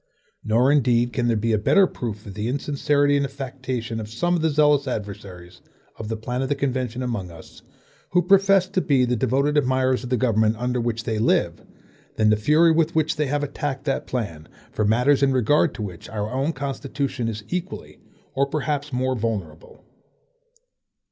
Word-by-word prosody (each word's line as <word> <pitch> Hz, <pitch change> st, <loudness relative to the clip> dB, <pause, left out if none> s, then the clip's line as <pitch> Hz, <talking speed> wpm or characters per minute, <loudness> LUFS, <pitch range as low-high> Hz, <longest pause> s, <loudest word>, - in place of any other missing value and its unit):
Nor 120 Hz, +5 st, +3 dB
indeed 120 Hz, -4 st, +2 dB
can 120 Hz, -2 st, 0 dB
there 115 Hz, -2 st, +2 dB
be 115 Hz, +2 st, 0 dB
a 110 Hz, -, +2 dB
better 195 Hz, -, +4 dB
proof 110 Hz, -, -6 dB
of 100 Hz, -, -8 dB
the 105 Hz, +2 st, -3 dB
insincerity 145 Hz, +2 st, +1 dB
and 140 Hz, -, +1 dB
affectation 130 Hz, -4 st, -5 dB
of 105 Hz, -1 st, -6 dB
some 175 Hz, +10 st, 0 dB
of 170 Hz, -, -1 dB
the 160 Hz, -, +2 dB
zealous 150 Hz, -1 st, +3 dB
adversaries 95 Hz, -6 st, -7 dB, 0.3 s
of 110 Hz, -, -7 dB
the 110 Hz, 0 st, -3 dB
plan 125 Hz, +3 st, -3 dB
of 135 Hz, -, -2 dB
the 145 Hz, -, +1 dB
convention 130 Hz, -3 st, -2 dB
among 115 Hz, -7 st, -3 dB
us, 80 Hz, -2 st, -14 dB, 0.5 s
who 180 Hz, 0 st, +2 dB
profess 195 Hz, 0 st, +4 dB
to 185 Hz, -, 0 dB
be 135 Hz, -6 st, +2 dB
the 125 Hz, 0 st, 0 dB
devoted 135 Hz, +5 st, +1 dB
admirers 130 Hz, -1 st, +1 dB
of 125 Hz, -, -6 dB
the 125 Hz, -, +1 dB
government 110 Hz, -2 st, +2 dB
under 125 Hz, +1 st, -1 dB
which 115 Hz, -1 st, -2 dB
they 110 Hz, -3 st, -2 dB
live, 110 Hz, -, +1 dB, 0.5 s
than 110 Hz, -1 st, +3 dB
the -, -, +5 dB
fury 150 Hz, +10 st, +4 dB
with 160 Hz, 0 st, +1 dB
which 160 Hz, 0 st, +1 dB
they 150 Hz, -1 st, -1 dB
have 145 Hz, +2 st, -1 dB
attacked 140 Hz, -1 st, -4 dB
that 135 Hz, -, -2 dB
plan, 90 Hz, -11 st, -4 dB, 0.2 s
for 105 Hz, -, -1 dB
matters 125 Hz, +7 st, +3 dB
in 135 Hz, -1 st, +3 dB
regard 140 Hz, +5 st, +3 dB
to 110 Hz, -, -5 dB
which 90 Hz, -5 st, -8 dB
our 105 Hz, 0 st, -4 dB
own 135 Hz, +5 st, 0 dB
constitution 140 Hz, -3 st, -3 dB
is 110 Hz, -2 st, -4 dB
equally 180 Hz, +1 st, -5 dB, 0.3 s
or 140 Hz, +1 st, +1 dB
perhaps 145 Hz, 0 st, -2 dB
more 130 Hz, 0 st, 0 dB
vulnerable. 105 Hz, -9 st, -5 dB
130 Hz, 190 wpm, -23 LUFS, 110-145 Hz, 0.5 s, the